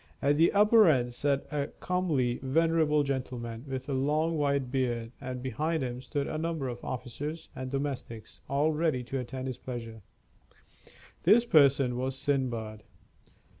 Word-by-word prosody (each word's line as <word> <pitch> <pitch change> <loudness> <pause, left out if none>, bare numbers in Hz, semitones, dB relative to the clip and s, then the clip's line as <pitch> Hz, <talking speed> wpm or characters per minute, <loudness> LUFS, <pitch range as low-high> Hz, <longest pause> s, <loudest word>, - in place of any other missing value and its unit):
At 145 +1 +2
the 165 +2 +5
upper 210 +1 +6
end 125 -4 +2
sat 140 +2 0
a 145 -1 -1
comely, 155 -10 0
venerable 155 +2 +2
gentleman, 125 -3 -4
with 130 -1 -5
a 140 - -2
long 150 +5 +1
white 140 -4 0
beard, 120 -4 -1
and 125 -1 -5
behind 155 +5 -1
him 125 0 -4
stood 140 +1 -2
a 155 - -3
number 160 -4 -2
of 120 -1 -6
officers 140 +6 -5
and 130 0 -5
domestics, 135 -5 -5
all 145 +3 +2
ready 155 -5 0
to 135 +2 -3
attend 130 +1 -5
his 130 -2 -5
pleasure. 115 -3 -7 1.2
This 235 +2 +5
person 140 - +4
was 130 +1 -2
Sindbad. 120 -6 -2
135 Hz, 150 wpm, -29 LUFS, 125-150 Hz, 1.2 s, upper